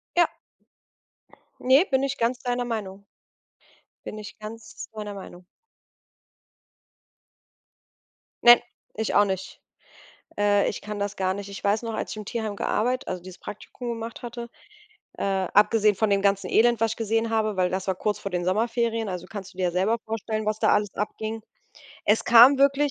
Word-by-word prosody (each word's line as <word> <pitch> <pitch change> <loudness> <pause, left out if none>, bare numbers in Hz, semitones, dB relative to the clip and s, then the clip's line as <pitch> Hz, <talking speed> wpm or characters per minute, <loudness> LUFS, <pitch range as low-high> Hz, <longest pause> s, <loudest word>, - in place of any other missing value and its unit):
Ja. 345 -1 +5 1.3
Ne, 270 +8 +5
bin 265 0 +2
ich 275 0 -1
ganz 235 +2 +1
deiner 245 0 -2
Meinung. 200 -4 -5 1.0
Bin 215 - -6
ich 210 0 -9
ganz 215 +1 -9
deiner 210 -1 -6
Meinung. 185 -2 -10 3.0
Nein, 240 0 +9 0.3
ich 220 0 -2
auch 205 - +6
nicht, 190 -1 -5 0.8
äh, 205 0 +3
ich - - -6
kann 210 0 -6
das 200 0 -2
gar 185 -1 0
nicht. 200 0 -7
Ich 200 - -9
weiß 205 +3 +2
noch, 230 -1 -4
als - - -4
ich - - -6
im 215 - -7
Tierheim 220 -1 -3
gearbeit 250 +5 -1
also 185 -1 -4
dieses 185 0 -11
Praktikum 240 +4 -8
gemacht 230 0 -5
hatte, 240 -1 -7 0.7
äh, - - -3
abgesehen 205 +2 +3
von 220 +1 +1
dem 200 -1 +2
ganzen 200 -1 +1
Elend, 235 0 +4
was 225 -1 +2
ich - - -18
gesehen 225 0 0
habe, 215 -3 0
weil 180 -1 +2
das 190 +1 -3
war 190 - +1
kurz 210 +2 -1
vor 200 - -5
den 175 -1 -2
Sommerferien, 225 +2 0
also 180 -1 -5
kannst 195 -3 -8
du - - -22
dir 185 - +1
ja 175 - +1
selber 195 +6 +1
vorstellen, 220 0 -3
was 215 0 -1
da - - +3
alles 205 -2 0
abging. 220 +2 -4 0.6
Es 210 +2 +3
kam 240 +4 +8
wirklich 280 +1 +3
215 Hz, 175 wpm, -25 LUFS, 200-230 Hz, 3.0 s, Nein